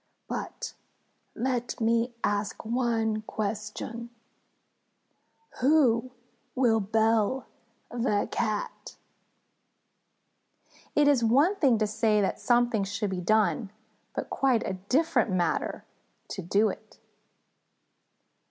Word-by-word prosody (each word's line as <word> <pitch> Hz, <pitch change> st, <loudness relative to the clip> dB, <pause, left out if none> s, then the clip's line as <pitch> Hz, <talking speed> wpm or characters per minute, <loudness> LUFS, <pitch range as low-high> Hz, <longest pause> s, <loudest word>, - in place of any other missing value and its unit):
But -, -, -5 dB, 0.6 s
let 245 Hz, -1 st, -2 dB
me 230 Hz, +2 st, +2 dB
ask 205 Hz, +1 st, -1 dB
one 225 Hz, -2 st, 0 dB
question: 215 Hz, +2 st, -4 dB, 1.5 s
Who 255 Hz, -4 st, +3 dB, 0.5 s
will 235 Hz, -4 st, +3 dB
bell 220 Hz, +3 st, +1 dB, 0.5 s
the 230 Hz, -4 st, 0 dB
Cat?" 215 Hz, -3 st, -3 dB, 2.0 s
_It 295 Hz, -, +6 dB
is 275 Hz, -5 st, +4 dB
one 280 Hz, -, +4 dB
thing 270 Hz, -, +4 dB
to 215 Hz, -, +1 dB
say 215 Hz, 0 st, +2 dB
that 195 Hz, -, 0 dB
something 240 Hz, -3 st, +2 dB
should 205 Hz, +1 st, -2 dB
be 185 Hz, -1 st, -3 dB
done, 215 Hz, +2 st, +2 dB, 0.5 s
but -, -, -4 dB
quite 260 Hz, -4 st, +2 dB
a -, -, -2 dB, 0.2 s
different 320 Hz, -2 st, +2 dB
matter 175 Hz, -3 st, -1 dB, 0.4 s
to 190 Hz, -, -5 dB
do 200 Hz, +5 st, +2 dB
it. -, -, -9 dB
225 Hz, 95 wpm, -28 LUFS, 210-245 Hz, 2.0 s, It